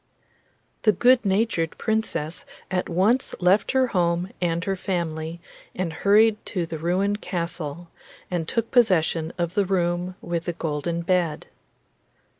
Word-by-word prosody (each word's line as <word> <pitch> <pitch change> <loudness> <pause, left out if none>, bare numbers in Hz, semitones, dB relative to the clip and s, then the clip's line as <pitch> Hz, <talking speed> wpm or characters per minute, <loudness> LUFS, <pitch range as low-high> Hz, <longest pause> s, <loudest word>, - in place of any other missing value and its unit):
The 215 - +5
good 245 +6 +4
natured 195 -4 0
Princess 175 -8 -1 0.3
at 180 -1 -1
once 205 +9 +2
left 185 +7 +3
her 260 -1 +4
home 175 -1 0
and 170 -1 0
her 195 +1 -1
family 170 -3 -3 0.4
and 180 -3 -2
hurried 210 +5 +4
to 180 -3 -2
the 160 -1 -6
ruined 195 +5 0
castle, 170 -2 -4 0.4
and 170 -3 -1
took 230 +3 -1
possession 170 -8 +3
of 170 -1 -1
the 205 - +2
room 180 -1 0
with 170 -1 -3
the 175 - -2
golden 165 +1 -2
bed. 170 -3 0
175 Hz, 135 wpm, -24 LUFS, 165-200 Hz, 0.4 s, The